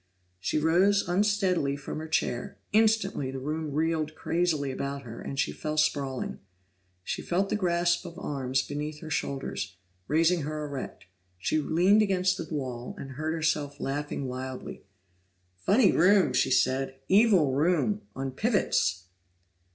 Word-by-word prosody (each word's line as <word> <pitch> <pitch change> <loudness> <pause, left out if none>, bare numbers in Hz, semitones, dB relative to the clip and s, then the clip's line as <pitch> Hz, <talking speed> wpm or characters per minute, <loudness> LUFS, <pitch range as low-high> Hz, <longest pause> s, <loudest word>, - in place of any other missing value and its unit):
She 95 - -1
rose 180 +6 +3
unsteadily 185 -6 +1
from 140 +2 -6
her 160 - -6
chair; 125 -6 -1 0.2
instantly 215 -9 +2
the 135 - -5
room 150 +3 -3
reeled 155 +1 0
crazily 160 -5 0
about 140 +1 -4
her 115 -2 -8
and 135 - -6
she - - +1
fell 155 0 -4
sprawling. 140 -4 0 0.6
She - - -3
felt 190 +3 0
the - - 0
grasp 175 -3 +1
of 170 - -10
arms 130 -2 -1
beneath 150 +2 -5
her 160 -2 -8
shoulders, 100 - -3 0.3
raising 165 +4 +3
her 150 +1 -3
erect; 140 -3 -6 0.3
she 125 +12 0
leaned 180 +8 +4
against 190 -2 +2
the 165 - -6
wall 125 -5 -4
and 135 - -7
heard 155 +4 -2
herself 150 -3 -1
laughing 140 0 -3
wildly. 130 0 -6 0.7
"Funny 195 - +4
room!" 180 -5 +4
she 125 +1 +2
said. 130 +1 +1
"Evil 190 - +5
room 180 +8 +2
on 135 0 -3
pivots!" 195 - +1
155 Hz, 145 wpm, -28 LUFS, 135-180 Hz, 0.7 s, Evil